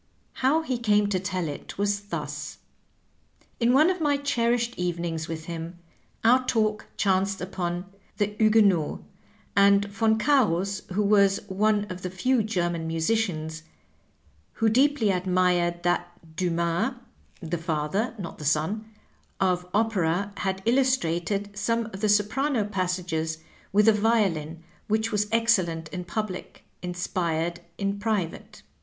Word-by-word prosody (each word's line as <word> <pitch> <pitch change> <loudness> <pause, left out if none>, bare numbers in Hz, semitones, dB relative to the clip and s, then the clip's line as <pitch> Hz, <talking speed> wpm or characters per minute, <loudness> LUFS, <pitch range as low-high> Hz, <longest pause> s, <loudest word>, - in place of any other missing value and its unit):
How 295 +5 +3
he 255 -6 -2
came 210 -3 +3
i;o 200 -2 0
tell 185 -2 -2
it 145 - -7
was 205 0 +1
thus: 205 - -5 1.0
In 235 0 +3
one 305 +7 +5
of 365 -2 -4
my 290 -2 +2
cherished 240 -4 0
evenings 170 -2 -2
with 160 -1 -5
him 170 +1 -6 0.5
our 250 +3 +5
talk 215 -2 0
chanced 195 0 +1
upon 180 -1 -3 0.3
"The 205 0 0
Huguenots," 210 -7 +3 0.5
and 200 0 +5 0.2
Yon 220 0 +4
Cams, 200 - +2
who 210 +3 +1
was 200 -1 +4
one 205 +2 +2
of 185 0 -7
the 185 - -3
few 235 +7 +1
German 175 -6 -1
musicians 160 -2 -1 0.9
who 225 -1 +2
deeply 255 -2 +3
admired 180 -2 +1
that 175 -2 -2
Dumas 170 +7 0 0.4
(the 170 -2 -3
father, 165 +8 -1
not 185 -5 -7
the - - -7
son) 160 +9 0 0.5
of 180 -1 +1
opera, 200 -3 +1
had 190 -1 -2
illustrated 205 -6 +1
some 230 +3 0
of 195 - -7
the 215 - +2
soprano 220 +5 +2
passages 180 -5 -2 0.3
with 210 +1 +4
the 225 - +7
violin 190 -8 +1 0.2
which 220 +1 0
was 210 -1 +1
excellent 185 -9 +2
in 180 +1 -6
public, 190 +1 -5 0.2
inspired 175 -2 -2 0.2
in 200 0 -2
private. 205 -6 -3
195 Hz, 130 wpm, -26 LUFS, 175-220 Hz, 1.0 s, the